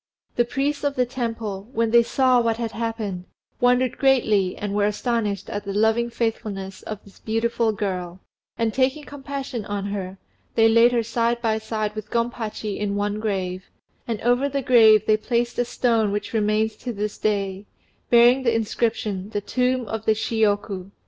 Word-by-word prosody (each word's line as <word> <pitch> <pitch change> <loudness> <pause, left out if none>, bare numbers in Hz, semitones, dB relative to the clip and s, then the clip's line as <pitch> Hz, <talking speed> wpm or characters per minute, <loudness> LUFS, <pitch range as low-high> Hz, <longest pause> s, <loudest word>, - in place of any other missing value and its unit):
The 240 - +3
priests 280 +4 -2
of 285 -1 0
the 250 - +2
temple, 225 -5 -4
when 225 0 +1
they 235 0 +7
saw 255 +1 +3
what 230 -1 0
had 230 -2 -3
happened, 220 -6 -4 0.3
wondered 250 0 +2
greatly 215 -9 +2
and 205 -1 -4
were 205 0 +2
astonished 210 -2 -1
at 205 - -4
the 200 -1 -5
loving 220 +3 +2
faithfulness 205 -5 -3
of 215 -1 -7
this 200 - -18
beautiful 225 +1 0
girl, 185 -4 -4 0.4
and 230 -2 0
taking 270 +3 +1
compassion 275 -4 -6
on 205 -1 -3
her, 195 -2 -4 0.4
they 225 -1 +5
laid 230 +2 +5
her 235 -1 +1
side 235 +1 0
by 220 -2 0
side 215 -1 -3
with 215 0 -7
Gompachi 230 -3 -2
in 205 -1 -1
one 205 +1 -1
grave, 190 -4 -3 0.4
and 230 -3 -2
over 245 +4 +2
the 275 -1 -2
grave 220 -4 +6
they 215 - +4
placed 240 +2 -1
a 245 - +2
stone 230 -4 +1
which 205 +2 -3
remains 215 0 +1
to 250 - -5
this 210 -1 -4
day, 200 -1 -1 0.4
bearing 240 +2 +6
the 235 -3 +1
inscription 215 -3 -1
"The 205 -1 -3
Tomb 250 +3 0
of 220 0 -4
the 220 - +3
Shiyoku." 205 -3 0
220 Hz, 175 wpm, -23 LUFS, 205-240 Hz, 0.4 s, they